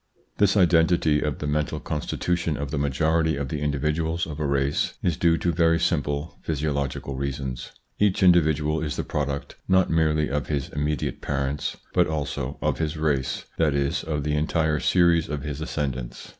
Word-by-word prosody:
This 100 0 +4
identity 85 -4 +4
of 75 -2 -1
the - - -5
mental 75 0 -1
constitution 85 +1 -2
of 70 -1 -4
the 75 - -1
majority 80 +3 +1
of 70 -1 -3
the 75 - -3
individuals 75 +3 0
of 80 -2 -7
a 75 - 0
race 70 +1 0
is 85 -3 +1
due 85 +1 +3
to 85 - 0
very 80 0 +3
simple 75 0 -1
physiological 70 -3 -2
reasons. 65 -2 -4 0.3
Each 100 -2 +2
individual 80 -3 +4
is 75 -4 -2
the - - -2
product 70 -1 -3
not 95 -1 +3
merely 80 -2 +2
of 70 +1 -2
his 70 -3 -2
immediate 75 -1 -2
parents 70 0 -2 0.2
but - - +4
also 70 -3 -3
of - - 0
his 80 -1 -1
race, 75 -4 -1
that 75 -3 +3
is 70 0 0
of 75 -3 -2
the 75 0 -1
entire 75 0 +1
series 85 -2 +3
of 75 -2 -3
his 75 0 -5
ascend 75 -4 -2
ants. - - -8
75 Hz, 175 wpm, -25 LUFS, 70-80 Hz, 0.3 s, This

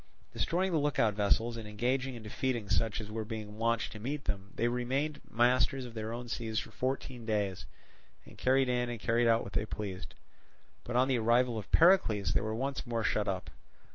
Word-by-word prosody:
Destroying 185 +3 0
the 165 - +2
look 145 -1 0
out 110 -2 +3
vessels, 110 +3 +1
and 110 -2 -7
engaging 125 +5 -1
and 115 - -9
defeating 115 -1 -2
such 110 -1 +1
as 105 -1 -7
were 110 0 -3
being 110 -1 -7
launched 115 0 +1
to 110 - -8
meet 140 +6 -4
them, 100 0 -3
they 120 - +1
remained 130 +5 -1
masters 125 +2 +2
of 120 - -9
their 110 0 -4
own 120 +1 -5
seas 115 -2 -3
for 115 - -2
fourteen 130 0 -3
days, 105 -4 -1 0.6
and - - -14
carried 130 +1 +3
in 125 -1 0
and 120 -2 -4
carried 115 +2 +2
out 115 0 +4
what 100 - -9
they - - +1
pleased. 100 -3 -6 0.7
But 120 - -5
on 130 +1 +4
the 130 -3 +2
arrival 120 +2 +3
of 105 - -10
Pericles, 110 - +4
they - - +2
were 110 +1 -2
once 135 +2 -3
more 115 -1 -1
shut - - +1
up. - - -3
115 Hz, 205 wpm, -32 LUFS, 110-130 Hz, 0.7 s, out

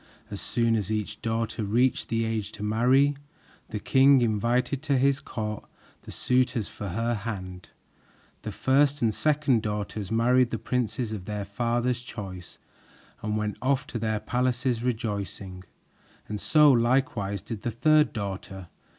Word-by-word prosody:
As - - -5
soon 115 -1 +1
as 105 -2 -2
each 105 -1 -3
daughter 115 -1 -2
reached 120 +6 +1
the 115 0 0
age 110 -2 -2
to 105 - -7
marry, 125 +7 +3 0.5
the 105 - -4
king 135 +2 +5
invited 120 +5 0
to 145 -3 +1
his 135 +1 +3
court 105 -1 -5 0.4
the - - -8
suitors 125 -3 +1
for 105 - -7
her 115 +6 -1
hand. 95 -5 -6 0.7
The - - -5
first 140 +1 +2
and 110 -2 +2
second 150 -5 +2
daughters 105 -1 -4
married 120 +2 +3
the 115 - -2
princes 125 -1 -2
of 100 -4 -5
their 105 0 -4
father's 120 +4 -1
choice 95 -7 -8 0.6
and 105 0 -1
went 105 -1 -2
off 135 0 +1
to 115 - -2
their 110 -1 -1
palaces 125 0 0
rejoicing, 100 -6 -3 0.6
and 105 -1 -5
so 150 -2 +6
likewise 115 -5 +1
did 110 -4 -6
the 120 - -2
third 155 +6 +3
daughter. 95 -4 -6
115 Hz, 150 wpm, -27 LUFS, 105-125 Hz, 0.7 s, so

